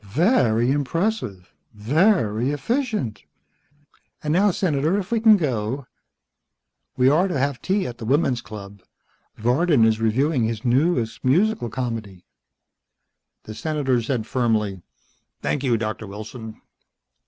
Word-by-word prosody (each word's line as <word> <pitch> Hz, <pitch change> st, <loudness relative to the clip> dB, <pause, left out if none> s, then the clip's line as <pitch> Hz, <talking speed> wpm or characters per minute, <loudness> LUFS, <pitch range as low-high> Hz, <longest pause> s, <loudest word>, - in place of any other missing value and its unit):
"Very 120 Hz, -, +2 dB
impressive. 145 Hz, -, -2 dB, 0.2 s
Very 125 Hz, -, +2 dB
efficient. 215 Hz, -, -2 dB, 1.0 s
And 150 Hz, 0 st, 0 dB
now, 200 Hz, +4 st, +4 dB
Senator, 165 Hz, -1 st, 0 dB
if 195 Hz, 0 st, -4 dB
we 230 Hz, -, +2 dB
can 220 Hz, -1 st, +6 dB
go. 130 Hz, -, -2 dB, 1.1 s
We 125 Hz, 0 st, +4 dB
are 160 Hz, +8 st, +4 dB
to 175 Hz, -, -2 dB
have 140 Hz, -1 st, -1 dB
tea 195 Hz, 0 st, 0 dB
at 120 Hz, -1 st, -7 dB
the 115 Hz, -, -6 dB
women's 130 Hz, -1 st, +1 dB
club. 100 Hz, -3 st, -10 dB, 0.6 s
Varden 125 Hz, +2 st, +3 dB
is 110 Hz, 0 st, +2 dB
reviewing 130 Hz, +4 st, +1 dB
his 110 Hz, 0 st, -4 dB
newest 125 Hz, -3 st, +1 dB
musical 175 Hz, -, +2 dB
comedy." 110 Hz, -7 st, -5 dB, 1.2 s
The 110 Hz, -, -8 dB
Senator 135 Hz, -2 st, 0 dB
said 115 Hz, -1 st, -2 dB
firmly, 110 Hz, -7 st, 0 dB, 0.6 s
"Thank 145 Hz, -, -1 dB
you, 120 Hz, -4 st, +2 dB
Doctor 110 Hz, -1 st, -4 dB
Wilson." 110 Hz, +2 st, -9 dB
130 Hz, 120 wpm, -23 LUFS, 110-160 Hz, 1.2 s, can